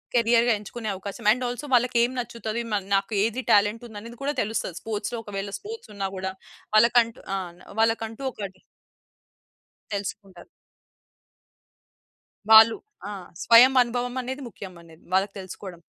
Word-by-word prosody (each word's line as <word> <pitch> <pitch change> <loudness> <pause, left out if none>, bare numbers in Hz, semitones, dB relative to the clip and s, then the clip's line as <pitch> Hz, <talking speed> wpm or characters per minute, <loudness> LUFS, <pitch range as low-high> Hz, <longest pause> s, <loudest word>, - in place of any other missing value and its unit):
కెరియర్‌గా 235 0 +4
ఎంచుకునే 215 +1 -6
అవకాశం. 200 +4 -8
And 250 +2 0
also 245 +4 -5
వాళ్ళకి 245 0 +3
ఏం 240 - +1
నచ్చుతది. 235 -1 -4
మ - - +2 0.2
నాకు 195 +3 0
ఏది 235 +3 -1
టాలెంటుందనేది 220 +2 0
కూడా 290 - 0
తెలుస్తది. 205 -4 -3
స్పోర్ట్స్‌లో 220 +2 -3
ఒకవేళ 200 -1 -5
స్పోర్ట్స్ 450 - -9
ఉన్నా 195 -1 -2
గూడా 190 0 -3 0.4
వాళ్ళకంటూ 230 +1 +4 0.2
ఆ! - - 0 0.4
వాళ్ళకంటూ 225 +1 0
ఒకటి 190 -3 -8 1.3
తెలుసుకుంటారు. 195 -2 -6 2.0
వాళ్ళు 220 +1 +9 0.3
ఆ! - - -5 0.3
స్వయం 245 +3 +8
అనుభవమనేది 245 +2 -2
ముఖ్యమనేది 170 -6 -12
వాళ్ళకి 195 +2 +2
తెలుసుకోవడం. 185 -2 -9
225 Hz, 115 wpm, -25 LUFS, 200-240 Hz, 2.0 s, వాళ్ళు